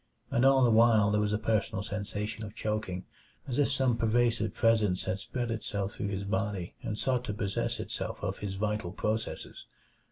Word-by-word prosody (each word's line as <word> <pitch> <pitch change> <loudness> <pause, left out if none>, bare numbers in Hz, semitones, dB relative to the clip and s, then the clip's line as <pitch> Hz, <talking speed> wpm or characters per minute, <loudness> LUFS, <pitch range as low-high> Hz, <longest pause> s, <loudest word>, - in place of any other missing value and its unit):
And 120 - +2
all 135 -1 +6
the 120 - +5
while 110 -2 +5
there 105 0 +2
was 105 0 +1
a 105 - +2
personal 110 -2 0
sensation 105 +1 -4
of 105 0 -8
choking, 105 -4 -2 0.4
as 130 +1 -1
if 145 - +3
some 130 -3 +2
pervasive 115 -1 +2
presence 110 -5 +3
had 95 - -2
spread 120 +2 -3
itself 100 -3 -2
through 100 - -4
his 100 -1 -2
body 100 -2 -2
and 105 - -3
sought 125 0 0
to 105 - -3
possess 100 -2 -1
itself - - -4
of - - -2
his 100 -2 -4
vital 105 -3 -1
processes. 110 +3 -3
105 Hz, 185 wpm, -30 LUFS, 100-115 Hz, 0.4 s, all